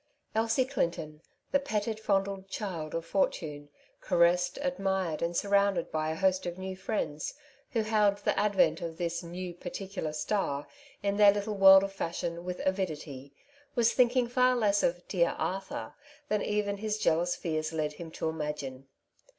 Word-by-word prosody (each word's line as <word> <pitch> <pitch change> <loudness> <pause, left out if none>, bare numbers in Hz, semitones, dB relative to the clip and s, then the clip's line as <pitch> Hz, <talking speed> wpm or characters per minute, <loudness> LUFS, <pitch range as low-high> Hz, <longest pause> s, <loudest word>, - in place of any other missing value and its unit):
Elsie 225 +3 +2
Clinton, 165 - -2 0.3
the 280 - +4
petted, 220 -4 -2
fondled 195 -2 0
child 175 -7 -4
of 165 0 -3
fortune, 150 -6 -1 0.3
caressedj 175 +1 +3
admired, 190 - -1
and 170 0 -1
surrounded 200 -3 +2
by 155 0 -1
a 160 - -2
host 185 +1 +1
of 175 0 -4
new 190 0 -5
friends, 185 -6 -3 0.4
who 225 -3 +2
hailed 210 -2 +3
the 205 - 0
advent 205 -2 +3
of 165 -1 -5
this 170 -1 -2
'^ - - -13
new 175 +1 -6
particular 180 -1 -5
star 155 -3 -1
'^ - - -23 0.4
in 200 0 0
their 205 -1 +8
little 205 +1 -2
world 195 -1 +8
of 195 0 -3
fashion 170 -2 -3
with 180 0 -5
avidity, 155 -8 -3 0.4
was 235 -2 +3
thinking 250 -1 +3
far 250 +1 +3
less 205 -4 +2
of 170 - +2
^^ 175 - -27
dear 170 -3 +1
Arthur 190 - -3 0.2
" 295 0 -26
than 210 -1 +1
even 205 -1 -1
his 215 +1 -2
jealous 175 -3 +2
fears 155 -2 -2
led 155 -2 -1
him 165 +2 -8
to 160 - -3
imagine. 150 -4 -4
190 Hz, 170 wpm, -30 LUFS, 165-205 Hz, 0.4 s, their